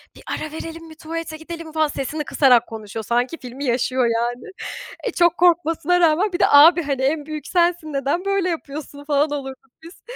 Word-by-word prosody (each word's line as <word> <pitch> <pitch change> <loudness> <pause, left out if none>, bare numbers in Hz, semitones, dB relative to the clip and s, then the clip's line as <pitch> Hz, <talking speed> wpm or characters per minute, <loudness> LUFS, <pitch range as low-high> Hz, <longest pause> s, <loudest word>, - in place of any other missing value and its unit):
"Bir - - -15
ara 310 - -4
verelim 330 +1 -8
mi 315 - -13
tuvalete 325 0 -6
gidelim 330 +1 -8
mi?" 315 - -12
falan, 315 -1 +2
sesini 295 +2 -4
kısarak 250 -6 +4
konuşuyor. 220 -1 -7
Sanki 245 +8 -1
filmi 260 +3 -7
yaşıyor 255 +1 +1
yani. 240 +1 -2 0.6
E, - - -1
çok 345 -1 +2
korkmasına 345 0 +2
rağmen, 350 +4 +3
bir 350 - -2
de - - +5
"Abi, 325 +4 +7
hani 275 -3 -2
en 290 +2 0
büyük 310 0 -7
sensin, 340 -3 +1
neden 280 +7 -1
böyle 395 -2 +1
yapıyorsun?" 290 -3 -6
falan 290 0 +1
olurduk 270 -1 -7
biz. 335 +3 -14
310 Hz, 190 wpm, -21 LUFS, 270-330 Hz, 0.6 s, Abi